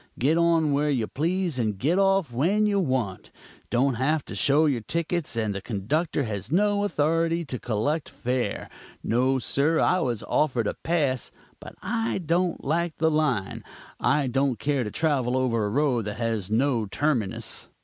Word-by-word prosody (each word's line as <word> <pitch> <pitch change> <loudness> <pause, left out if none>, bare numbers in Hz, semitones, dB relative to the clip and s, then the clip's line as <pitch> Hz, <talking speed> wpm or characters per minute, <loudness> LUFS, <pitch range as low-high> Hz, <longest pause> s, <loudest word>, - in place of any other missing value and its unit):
Get 145 +6 +2
on 165 -3 +3
where 145 +1 +1
you 125 -6 +1
please 170 - -1
and 110 -4 -1
get 160 - +1
off 195 -8 +2
when 185 - +2
you 205 -1 +2
want. 130 - -2 0.4
Don't 130 +3 +2
have 150 +2 +1
to - - -8
show 145 +3 +3
your 135 -6 +1
tickets, 170 +3 -2
and 110 -2 0
the 100 - -5
conductor 140 - -1
has 105 -1 -4
no 205 +3 +2
authority 165 -1 +1
to 130 -4 -4
collect 130 +7 -1
fare. 125 0 -2 0.4
No, 130 +3 +2
sir; 140 +5 +1
I 185 - +3
was 120 - -2
offered 130 -7 +1
a - - -1
pass, 145 -7 -1 0.3
but - - -11
I 225 0 -1
don't 175 0 0
like 165 +3 -1
the 160 0 +2
line. 145 -11 0 0.4
I 150 -2 +2
don't 135 -1 0
care 140 +3 0
to 105 - -4
travel 130 -4 0
over 115 -4 +1
a - - -1
road 125 -2 +1
that 105 0 -4
has 110 -4 -2
no 115 -1 +1
terminus. 120 -3 -2
140 Hz, 170 wpm, -25 LUFS, 120-165 Hz, 0.4 s, on